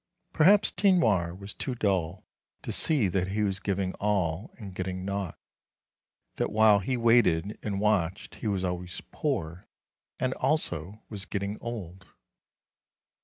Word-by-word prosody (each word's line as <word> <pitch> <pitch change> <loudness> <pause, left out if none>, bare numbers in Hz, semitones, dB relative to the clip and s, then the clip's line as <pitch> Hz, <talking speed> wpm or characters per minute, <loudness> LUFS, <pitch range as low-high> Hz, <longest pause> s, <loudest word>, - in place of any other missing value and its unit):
Perhaps 195 +6 +5
Tinoir 115 - +2
was 100 +1 -8
too 130 - -4
dull 95 -5 -1 0.4
to - - -4
see 145 -10 +4
that 90 0 0
he 105 +3 -1
was 95 -2 -1
giving 95 -1 -1
all 95 -2 0
and 100 -5 -9
getting 95 0 -4
naught; 100 -2 -3 1.0
that - - -1
while 110 -1 +5
he 125 +7 -1
waited 115 -5 +3
and 100 -2 -3
watched 100 -3 0
he - - -5
was 100 -3 0
always 90 -1 -3
poor, 85 +3 -3 0.5
and 130 0 0
also 100 - -1
was 100 -3 -5
getting 100 +1 -3
old. 95 -6 -7
100 Hz, 135 wpm, -28 LUFS, 90-110 Hz, 1.0 s, Perhaps